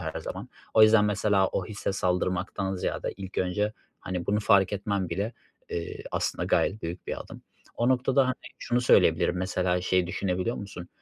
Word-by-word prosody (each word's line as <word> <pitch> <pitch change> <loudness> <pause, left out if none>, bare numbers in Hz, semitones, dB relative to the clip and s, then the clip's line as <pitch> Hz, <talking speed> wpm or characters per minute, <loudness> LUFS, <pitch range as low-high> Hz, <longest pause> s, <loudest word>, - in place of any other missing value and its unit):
her - - -4
zaman. - - -6 0.3
O 110 - +7
yüzden 110 -1 +7
mesela 105 -1 +2
o - - -2
hisse 105 -2 -3
saldırmaktan 95 +1 -1
ziyade 90 - -2
ilk 95 -1 -6
önce, 105 +4 0 0.3
hani, 90 -2 -4
bunu 105 +1 +1
fark 100 -3 +4
etmen 100 -2 -1
bile, 100 +7 -2 0.4
eee, 85 - -4
aslında - - -1
gayet 105 - +1
büyük 85 +2 -6
bir - - -4
adım. - - -10 0.3
O 120 - +1
noktada 130 +1 +3
hani 130 - 0 0.2
şunu 120 +1 0
söyleyebilirim, 90 -6 +4
mesela 90 -1 0
şeyi 90 -1 +1
düşünebiliyor 95 +3 -1
musun? 95 -3 -8
95 Hz, 170 wpm, -27 LUFS, 90-105 Hz, 0.4 s, O